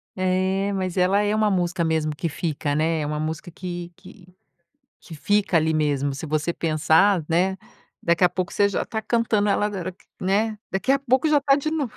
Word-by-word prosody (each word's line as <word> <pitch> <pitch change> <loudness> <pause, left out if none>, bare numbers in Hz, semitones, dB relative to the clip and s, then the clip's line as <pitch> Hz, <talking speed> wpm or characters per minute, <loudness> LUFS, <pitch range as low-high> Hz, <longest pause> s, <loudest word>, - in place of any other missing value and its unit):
É, 190 +1 0
mas 185 -2 -2
ela 190 +2 +3
é 210 0 0
uma 215 -1 +2
música 175 -3 0
mesmo 160 -2 0
que 165 +3 -3
fica, 150 -2 -2
né. 160 +1 +1
É - - -2
uma 150 +1 -3
música 155 +2 -4
que 175 0 -7
que 180 0 -16 0.7
que 165 - -11
fica 205 +3 +1
ali 160 0 +2
mesmo 145 -2 0
se 140 +4 -6
você 155 +2 -1
pensar, 165 +3 +2
né. 180 +3 +1 0.5
Daqui 170 +1 +2
a - - +6
pouco 180 0 -4
você 205 - +3
já 200 - -2
tá 220 - -4
cantando 220 -2 +1
ela 200 - +2
agora 190 -3 -4
que, 180 - -27 0.2
né 210 +3 0
daqui 195 +8 +1
a 275 - +3
pouco 265 +2 +1
já 300 -1 +4
tá 275 0 +3
de 295 +2 -2
novo. 290 -6 -2
185 Hz, 205 wpm, -23 LUFS, 160-205 Hz, 0.7 s, a